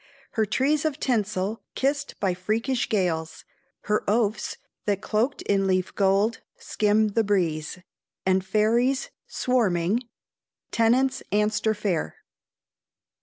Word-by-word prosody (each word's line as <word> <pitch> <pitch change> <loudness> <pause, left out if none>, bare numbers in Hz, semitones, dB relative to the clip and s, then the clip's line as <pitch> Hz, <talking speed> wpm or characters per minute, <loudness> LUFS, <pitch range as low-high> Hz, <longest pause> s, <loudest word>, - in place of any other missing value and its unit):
"Her 220 -2 0
trees 280 +8 +1
of 310 -2 -1
tinsel 210 -3 -1
kissed 280 +2 -1
by 190 -2 +1
freakish 225 +8 -1
gales, 165 -6 -1 0.4
"Her 210 0 0
Ouphs 215 0 0 0.3
that, 205 -2 +1
cloaked 225 +7 -1
in 195 -1 +1
leaf 185 -1 0
gold, 200 +3 +2 0.2
skim 215 +1 +1
the 225 +2 +1
breeze, 175 -6 0 0.5
"And 190 0 +3
fairies, 235 +6 +1 0.2
swarming 210 -4 +1 0.4
" - - -59
TENNANT'S 255 +4 +2
ANSTER 210 +1 +1
FAIR. 200 -6 -2
210 Hz, 115 wpm, -25 LUFS, 190-235 Hz, 0.5 s, And